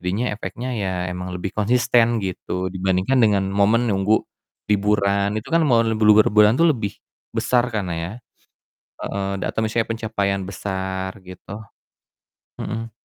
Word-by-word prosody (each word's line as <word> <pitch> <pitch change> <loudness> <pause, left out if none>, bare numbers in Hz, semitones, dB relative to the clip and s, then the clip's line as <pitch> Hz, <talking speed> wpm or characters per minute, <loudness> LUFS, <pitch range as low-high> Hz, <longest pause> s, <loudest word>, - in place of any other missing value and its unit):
Jadinya 100 +7 -1
efeknya 120 +4 -5
ya 95 -2 -1 0.2
emang 90 0 -5
lebih 95 +2 -4
konsisten 120 +1 +3
gitu, 95 -1 -3
dibandingkan 95 +6 +1
dengan 100 -3 +3
momen 110 +4 +3
nunggu 100 +3 +2 0.5
liburan, 100 0 +2
itu - - -9
kan 165 0 +4
momen 115 -3 +3
bluber 105 0 +6
bulan 105 +1 +6
tuh, 165 0 +4
lebih 105 -7 -4 0.4
besar 125 -1 +2
kan 100 -4 -1
ya, 85 +8 -5 0.9
heeh, 100 0 -3
dan - - -2
atau - - -2
misalnya 115 +1 0
pencapaian 100 -3 -1
besar 95 0 -4
gitu. 95 +3 -10 1.0
Mhm. 115 +1 -4
105 Hz, 140 wpm, -22 LUFS, 95-115 Hz, 1.0 s, bluber